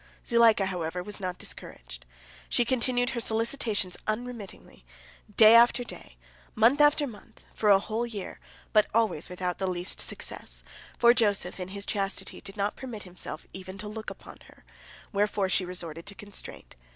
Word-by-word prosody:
Zuleika, 230 -4 +5
however, 180 -1 -3
was 210 +2 -5
not 185 -2 -3
discouraged; - - -9 0.4
she 240 - +3
continued 245 0 +2
her 240 - -2
solicitations 225 -4 0
unremittingly, 220 - -5 0.5
day 220 0 +9
after 235 +1 +6
day, - - -11 0.4
month 240 +6 +5
after 295 0 +5
month, 220 -7 -12
for 210 - +1
a 200 - +8
whole 220 +4 -2
year, 210 -5 -6 0.3
but 215 -1 +5
always 220 -9 +1
without 180 -1 -3
the 190 - 0
least 180 0 -3
success, - - -7 0.3
for 235 0 +7
Joseph 205 -6 +1
in 180 - -4
his 200 +1 -6
chastity 195 -1 -2
did 195 - -8
not 200 +1 0
permit 240 -6 -6
himself 180 -1 -8
even 190 0 -8
to 210 - -6
look 220 +1 -5
upon - - -11
her, - - -20 0.5
wherefore 205 -1 +1
she 185 0 +2
resorted 170 -2 -5
to 200 - -6
constraint. 200 - -7
205 Hz, 160 wpm, -28 LUFS, 185-230 Hz, 0.5 s, day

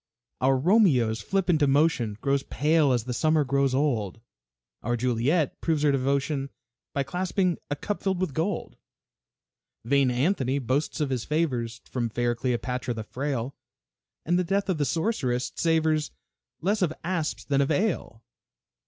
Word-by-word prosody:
Our 135 +1 +3
Romeo's 130 - +3
flippant 180 - +1
emotion 140 -7 +2
Grows 140 0 +1
pale 150 +1 +2
as 120 -3 +1
the 125 +1 -4
summer 155 +3 +2
grows 140 -1 +1
old; 120 -8 0 0.6
Our 120 +2 -1
Juliet 125 +6 0
proves 160 -3 0
her 145 - +4
devotion 140 +1 0 0.4
By 140 - 0
clasping 180 +3 -1
a 145 - -1
cup 205 +8 -4
filled 190 -2 0
with 185 -6 -1
gold. 170 +8 -2 1.1
Vain 140 +1 +3
Anthony 130 +1 +1
boasts 140 +4 -1
of 145 -2 0
his 125 -3 -1
favors 125 -7 -1
From 120 -2 -2
fair 120 +1 0
Cleopatra 125 0 -2
the 110 - -4
frail, 130 +1 -3 0.7
And 175 +2 +2
the - - +2
death 195 +3 -1
of 175 -5 0
the 145 - +2
sorceress 135 - -1
savors 160 -2 +1 0.5
Less 200 +5 +1
of 165 -4 +1
asps 165 -3 -2
than 140 -1 +2
of 140 - +1
ale. 155 - -1
140 Hz, 150 wpm, -26 LUFS, 125-165 Hz, 1.1 s, her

